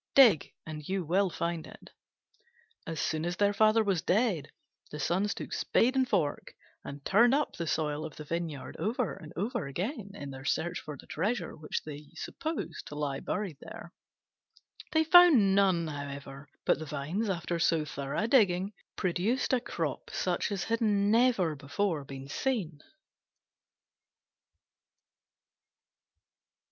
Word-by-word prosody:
Dig, 230 - +6
and 155 -1 -7
you 190 -2 -1
will 190 +4 +2
find 170 -1 -3
it." - - -14 1.0
As 165 -1 -4
soon 155 0 -1
as 175 +2 -2
their 205 0 +3
father 215 +2 +4
was 195 -5 +1
dead, 200 - +1 0.4
the 150 - -7
Sons 185 +8 0
took - - -6
spade 255 +3 +2
and 260 -1 +2
fork 165 -9 -1 0.3
and 140 0 -8
turned 235 +6 +5
up 295 0 0
the 170 - -4
soil 150 -1 -1
of 160 -3 -7
the 150 - -7
vineyard 160 -3 -4
over 230 +3 -1
and 160 -5 -11
over 210 - -2
again, 200 - -4
in 145 -6 -7
their 130 0 -9
search 170 +5 -1
for 150 -2 -8
the - - -14
treasure 210 +10 -2
which 150 -1 -4
they 150 -1 -8
supposed 320 +1 -5
to 150 - -8
lie 145 -2 -2
buried 195 -8 -3
there. - - -10 1.0
They 320 -2 +4
found 320 - +7
none, 190 -4 +3
however: 140 -2 -7 0.2
but - - +3
the 155 - -5
vines, 155 +9 -2
after 170 -2 -2
so 165 -1 +2
thorough 140 +5 -3
a - - +1
digging, 200 -5 +3 0.2
produced 195 +10 0
a 250 - +3
crop - - -3
such - - -1
as 195 -2 -1
had 230 0 -1
never 205 -4 +3
before 145 +3 -1
been 135 0 -8
seen. 180 - -2
175 Hz, 150 wpm, -30 LUFS, 150-215 Hz, 1.0 s, found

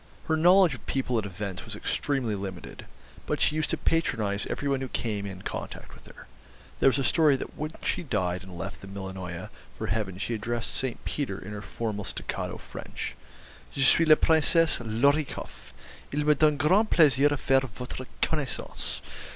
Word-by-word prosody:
Her 160 - +2
knowledge 175 +1 +6
of 125 - -9
people 125 -3 0
and 100 - -3
events 95 0 -5
was 110 -2 -7
extremely 130 +1 -1
limited; 95 -4 -6 0.4
but - - 0
she 150 - +3
used 155 -1 0
to - - 0
patronise 110 -11 0
every 145 - -3
one 135 -1 +1
who 135 - -2
came 105 -4 -2
in 95 -1 -8
contact - - -6
with - - -16
her. - - -13 0.5
There - - +6
was 135 - +1
a 135 - 0
story 150 +2 +4
that - - -6
when 155 +1 -3
she - - 0
died 90 - -1
and 95 -2 -10
left 95 +3 -6
the 100 - -9
Millionaya 95 -3 -6 0.3
for - - -3
Heaven 100 -3 -2
she 110 +5 -2
addressed 115 +2 -2
St. 130 -3 -3
Peter 135 -10 -2
in 100 - -8
her 105 -1 -5
formal 105 0 -4
staccato - - -4
French: - - -7 0.6
'Je 135 - +2
suis 165 +5 +6
la 155 - +9
Princesse 160 +1 +4
Lor 115 +6 +4
i 155 - 0
koff. - - -9 0.4
Il 145 +1 0
me 150 - +6
donne 150 0 +3
grand 185 +9 +4
plaisir 145 -3 +5
à 145 - 0
faire 135 0 +3
votre 125 +3 -7 0.2
connaissance. 150 -5 -2
125 Hz, 190 wpm, -28 LUFS, 100-150 Hz, 0.6 s, la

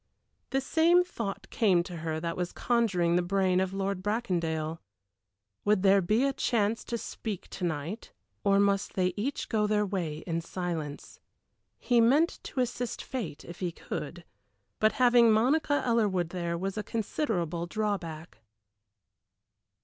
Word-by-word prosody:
The 270 - +1
same 335 +5 +4
thought 205 - -5
came 185 -6 +3
to 175 -1 -7
her 160 -1 -3
that 165 +1 -3
was 180 -1 -2
conjuring 190 -8 +2
the - - +3
brain 185 0 +2
of 190 0 0
Lord 195 -1 -2
Bracondale: 170 -7 -1 0.8
would 205 -2 +2
there 195 0 +6
be 215 +8 +2
a 275 0 +2
chance 225 -4 0
to 235 - -2
speak 215 -3 -6
to 185 - -6
night, 165 +5 -3 0.3
or 195 0 +4
must 200 0 +1
they 185 -1 +1
each 255 +7 -2
go 210 -1 +1
their 210 0 +2
way 170 -6 -3
in 165 -1 -1
silence? 165 -4 -5 0.6
He 240 -2 +3
meant 285 +9 +3
to 260 - -2
assist 245 -1 -3
fate 180 - -5
if 170 - -10
he 180 -2 -1
could, - - -6 0.5
but 215 0 +4
having 240 -2 +5
Monica 285 +7 +2
Ellerwood 205 -8 +1
there 170 -1 -2
was 195 +4 -3
a - - -3
considerable 180 - -2
drawback. 170 - -3
195 Hz, 150 wpm, -29 LUFS, 175-230 Hz, 0.8 s, there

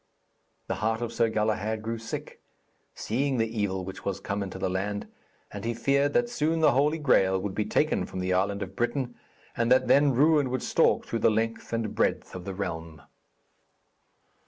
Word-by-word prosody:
The - - -2
heart 110 +1 +1
of 115 0 -4
Sir 115 0 +2
Galahad 110 0 -1
grew 115 +1 -3
sick, 115 - -7 0.5
seeing 130 +4 -1
the 115 - +2 0.2
evil 95 -2 -1
which 95 - -8
was 100 -1 -2
come 100 +1 -3
into 95 -1 -5
the 95 - -1
land, 100 +2 -2 0.5
and - - -7
he 115 0 -2
feared 140 +3 +2
that 240 0 +3
soon 165 -8 0
the 160 - +5
Holy 145 +5 +2
Graal 95 -11 +3
would 95 0 -4
be 105 - -1
taken - - +1
from - - -8
the 90 0 0
island 100 +2 0
of 95 0 -9
Britain, 120 +1 -1 0.4
and 115 +1 0
that 130 - +5
then 140 0 +5
ruin 145 0 +4
would 130 0 -2
stalk - - +2
throughout 115 - -3
the - - +5
length 115 +1 -2
and 115 -2 -2
breadth - - 0
of 90 -1 -7
the 95 - -5
realm. 80 -5 -5
110 Hz, 190 wpm, -27 LUFS, 95-130 Hz, 0.5 s, the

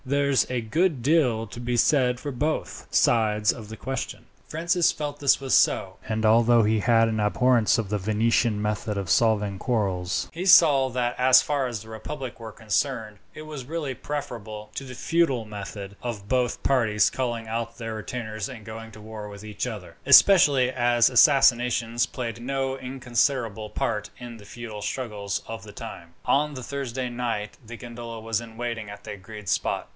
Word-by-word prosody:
There's 140 0 +1
a 125 -1 -1
good 150 +3 0
deal 130 -7 +2
to 105 +2 -10
be 120 0 -2
said 125 -2 +3
for 145 - -5
both 150 +5 -3
sides 105 -2 +3
of 110 -4 -10
the 110 - -8
question." 135 0 -5 0.2
Francis 170 +2 +1
felt 145 -1 -5
this 140 -2 +4
was 135 -1 -2
so, - - +3
and 110 0 -1
that - - +4
although 115 +1 +5
he 110 +1 +2
had 115 +1 +4
an 110 -1 -1
abhorrence 115 +2 +3
of 110 -4 -2
the 105 0 -1
Venetian 110 +2 +1
method 105 0 -2
of 95 -3 -2
settling 105 -4 +2
quarrels, 95 -6 -1
he 175 +3 -4
saw 150 -8 +6
that 125 -1 -1
as 130 0 +6
far 140 -3 0
as 115 -4 -5
the 110 0 -9
public 130 0 -7
were 110 -1 -8
concerned, 110 0 -2 0.2
it 155 - -8
was 150 -4 -8
really 150 -2 -3
preferable 115 -7 -6
to - - -4
the 130 -1 -9
feudal 140 -6 +1
method, 100 -1 -8
of 110 -5 -5
both 125 +1 0
parties 115 -6 +3
calling 120 -3 -3
out 115 +1 -4
their 115 -1 -5
retainers 110 0 -5
and 115 -5 -10
going 115 0 -8
to 110 - -13
war 105 -1 -8
with 100 0 -10
each 105 +3 -4
other, 100 -8 -8
especially 145 -10 +7
as 120 -2 +3
assassinations 125 -2 +4
played 115 -3 -5
no 135 +1 -2
inconsiderable 125 -4 -1
part 105 0 -2
in 120 -1 -9
the 105 - -14
feudal 110 -1 -8
struggles 105 -3 -3
of 115 -3 -6
the 105 - -10
time. 85 -6 -9
On 150 +1 +1
the 130 - -7
Thursday 130 -2 -4
night 120 -4 -3
the 120 +1 -9
gondola 120 -1 -8
was 115 0 -2
in 115 -1 -12
waiting 115 -3 -4
at 100 0 -10
the 105 - -6
agreed 105 +1 -11
spot. - - -1
115 Hz, 180 wpm, -25 LUFS, 110-130 Hz, 0.2 s, especially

